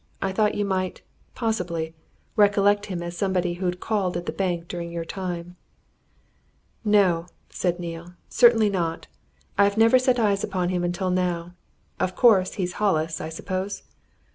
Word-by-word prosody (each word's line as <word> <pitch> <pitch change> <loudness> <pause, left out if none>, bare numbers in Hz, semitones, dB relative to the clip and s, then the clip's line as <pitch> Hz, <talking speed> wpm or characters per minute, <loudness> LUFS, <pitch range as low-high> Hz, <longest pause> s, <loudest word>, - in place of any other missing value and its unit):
"I 195 - -1
thought 210 +2 +1
you 205 - 0
might 185 -2 -2 0.3
possibly 175 -8 -2 0.4
recollect 205 -1 +4
him 180 -4 -4
as 175 0 -6
somebody 180 -1 0
who'd 180 -1 -1
called 195 -5 -1
at 175 - -5
the - - -2
bank 175 -3 -2
during 170 -1 -5
your 170 -1 -4
time." 175 -1 -5 1.3
"No!" 190 -6 +3 0.2
said 175 -1 -1
Neale. 170 0 -7
"Certainly 225 -4 +5
not! 170 -4 -2 0.5
I've 200 +1 +4
never 225 +3 +6
set 255 -1 +2
eyes 205 -4 +2
on 185 -3 -1
him 180 -1 -1
until 175 +1 -1
now. 175 -1 -1 0.5
Of 185 - -1
course, 200 -6 +5
he's 180 -2 -3
Hollis, 160 -6 +1
I 160 - -4
suppose?" 185 +4 -4
185 Hz, 150 wpm, -24 LUFS, 175-205 Hz, 1.3 s, never